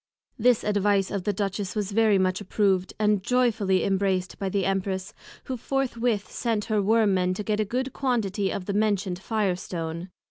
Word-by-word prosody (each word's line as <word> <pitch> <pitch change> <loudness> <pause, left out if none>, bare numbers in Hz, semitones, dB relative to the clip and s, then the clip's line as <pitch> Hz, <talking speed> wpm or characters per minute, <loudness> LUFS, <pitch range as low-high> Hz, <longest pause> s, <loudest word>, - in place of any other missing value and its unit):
This 245 0 +4
Advice 205 -1 +1
of 195 -3 -3
the 205 - +2
Duchess 200 0 -3
was 210 -1 -2
very 215 -1 +4
much 185 0 +1
approved; 195 -3 +1
and 210 -2 +2
joyfully 220 -5 +2
embraced 190 -1 0
by 195 - -1
the 195 -1 0
Empress, 190 0 -2 0.3
who 260 - -4
forthwith 240 -4 -1
sent 225 -3 -1
her 215 -2 +1
Worm 215 0 +3
men 185 0 +1
to 210 - -4
get 210 0 -1
a 215 - +2
good 255 +5 -2
quantity 210 -7 0
of 190 - -4
the 200 - -2
mentioned 200 -3 0
Fire 205 -2 0
stone. 170 0 -5
205 Hz, 180 wpm, -26 LUFS, 190-220 Hz, 0.3 s, This